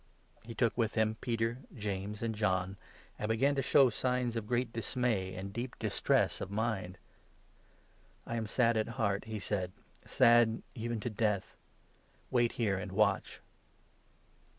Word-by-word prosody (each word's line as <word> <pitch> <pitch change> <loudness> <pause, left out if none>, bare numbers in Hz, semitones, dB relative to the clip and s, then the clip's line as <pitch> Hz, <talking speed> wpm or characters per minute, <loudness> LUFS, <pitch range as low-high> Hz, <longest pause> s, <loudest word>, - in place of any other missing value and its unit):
He 115 0 -9
took 115 -3 +2
with 115 -2 0
him 110 0 +1
Peter, 115 0 -1 0.2
James, 105 +1 -4
and 115 -1 -1
John, 95 -3 0 0.4
and 105 - -2
began 130 +6 +3
to 140 - 0
show 135 -1 +5
33 - - -5
signs 125 -2 0
of 110 -2 -3
great 120 -1 0
dismay 110 -4 -1
and 95 +1 -6
deep 120 +3 -4
distress - - +1
of - - -4
mind. 100 -3 -2 1.3
"I 115 - -4
am 115 -2 -2
sad 115 0 +2
at 110 - +1
heart," 100 -2 0
he 110 -1 -4
said, 95 -3 -2 0.4
"sad 120 -2 +4
even 115 0 -3
to 120 - -3
death; 105 -2 -1 0.8
wait 120 -2 +3
34 - - -15
here, 105 -5 +1
and 95 - -6
watch." 105 0 +1
110 Hz, 155 wpm, -33 LUFS, 100-120 Hz, 1.3 s, show